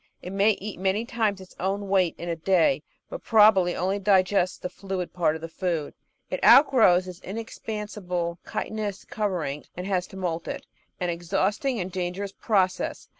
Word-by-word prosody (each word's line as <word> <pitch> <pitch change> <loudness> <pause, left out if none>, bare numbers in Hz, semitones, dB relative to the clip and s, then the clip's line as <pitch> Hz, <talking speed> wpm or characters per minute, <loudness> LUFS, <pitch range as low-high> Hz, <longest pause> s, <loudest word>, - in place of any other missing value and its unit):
It 180 - -6
may 200 +2 +4
eat 200 -1 -7
many 195 +4 0
times 220 -4 0
its 185 - -14
own 195 +2 -1
weight 190 -3 +2
in 170 - -6
a 170 - -1
day, 185 - +2 0.3
but - - -7
probably 210 -5 +5
only 190 +3 0
digests 190 -2 +2
the - - -4
fluid 190 -1 -5
part 170 -3 +1
of 160 - -7
the 165 - -5
food. 165 -3 -2 0.4
It - - -3
outgrows 220 -11 +6
its 180 -1 -8
inexpansible 200 -5 -4
chitinous 210 -3 -4
cover 200 -6 -2
ing, 140 +1 -5
and 180 - -4
has 185 -2 0
to 190 - -11
moult 170 -3 -3
it, - - -5 0.3
an 180 -1 0
exhausting 195 - -1
and 185 0 -3
dangerous 185 +2 -3
process. 190 -4 0
190 Hz, 175 wpm, -26 LUFS, 180-205 Hz, 0.4 s, outgrows